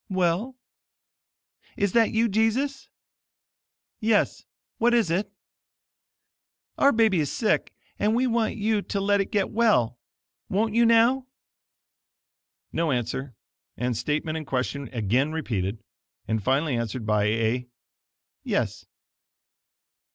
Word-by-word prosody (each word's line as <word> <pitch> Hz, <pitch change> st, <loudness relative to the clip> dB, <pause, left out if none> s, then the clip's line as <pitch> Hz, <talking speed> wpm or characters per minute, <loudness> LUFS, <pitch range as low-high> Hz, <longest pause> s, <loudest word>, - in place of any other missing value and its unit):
"Well?" 185 Hz, +7 st, 0 dB, 1.2 s
"Is 200 Hz, -2 st, +1 dB
that 230 Hz, +1 st, +4 dB
you, 225 Hz, +1 st, +2 dB
Jesus?" 230 Hz, +6 st, 0 dB, 1.1 s
"Yes. 220 Hz, -1 st, +1 dB, 0.3 s
What 240 Hz, +1 st, +4 dB
is 225 Hz, -8 st, +2 dB
it?" 195 Hz, +4 st, -1 dB, 1.5 s
"Our 280 Hz, -, +6 dB
baby 220 Hz, -6 st, +3 dB
is 145 Hz, -3 st, -1 dB
sick, 220 Hz, -, 0 dB, 0.3 s
and 215 Hz, +2 st, +2 dB
we 250 Hz, +2 st, +2 dB
want 230 Hz, -2 st, 0 dB
you 215 Hz, 0 st, 0 dB
to 200 Hz, -, -3 dB
let 200 Hz, 0 st, +2 dB
it 195 Hz, -, -5 dB
get 200 Hz, -2 st, 0 dB
well. 160 Hz, -, +2 dB, 0.5 s
Won't 215 Hz, +3 st, 0 dB
you, 235 Hz, 0 st, +4 dB
now?" 235 Hz, +3 st, +4 dB, 1.5 s
No 165 Hz, -2 st, 0 dB
answer, 125 Hz, +1 st, -3 dB, 0.4 s
and 125 Hz, 0 st, -1 dB
statement 150 Hz, +6 st, -2 dB
and 155 Hz, -, -9 dB
question 135 Hz, +1 st, -2 dB
again 125 Hz, +6 st, 0 dB
repeated, 110 Hz, -, -3 dB, 0.4 s
and 110 Hz, -1 st, 0 dB
finally 135 Hz, +3 st, +1 dB
answered 115 Hz, 0 st, -3 dB
by 105 Hz, -1 st, +2 dB
a 115 Hz, +3 st, 0 dB, 0.8 s
"Yes." -, -, -2 dB
185 Hz, 115 wpm, -25 LUFS, -, 1.5 s, Our